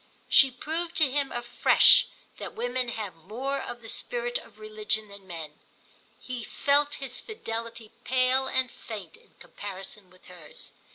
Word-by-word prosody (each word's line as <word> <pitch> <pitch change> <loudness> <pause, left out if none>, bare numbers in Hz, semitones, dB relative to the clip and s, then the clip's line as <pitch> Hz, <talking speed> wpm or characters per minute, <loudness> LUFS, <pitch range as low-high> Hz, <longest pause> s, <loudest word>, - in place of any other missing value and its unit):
She 270 - +8
proved 320 +7 -4
to 305 -5 +4
him 280 0 0
afresh 240 0 +6 0.3
that - - -7
women 245 +1 -1
have 215 -5 -4
more 245 - -4
of 240 -1 -7
the - - -9
spirit - - 0
of - - -16
religion 430 - -2
than 200 -1 -13
men; 160 -4 -8 0.6
he 250 -2 -6
felt 285 +5 +2
his 265 -3 -4
fidelity 230 - -6
pale 260 +1 +2
and 260 -1 +1
faint 205 -7 -8
in - - -25
comparison 195 -1 -8
with 185 0 -21
hers. 175 -4 -11
245 Hz, 150 wpm, -28 LUFS, 210-275 Hz, 0.6 s, She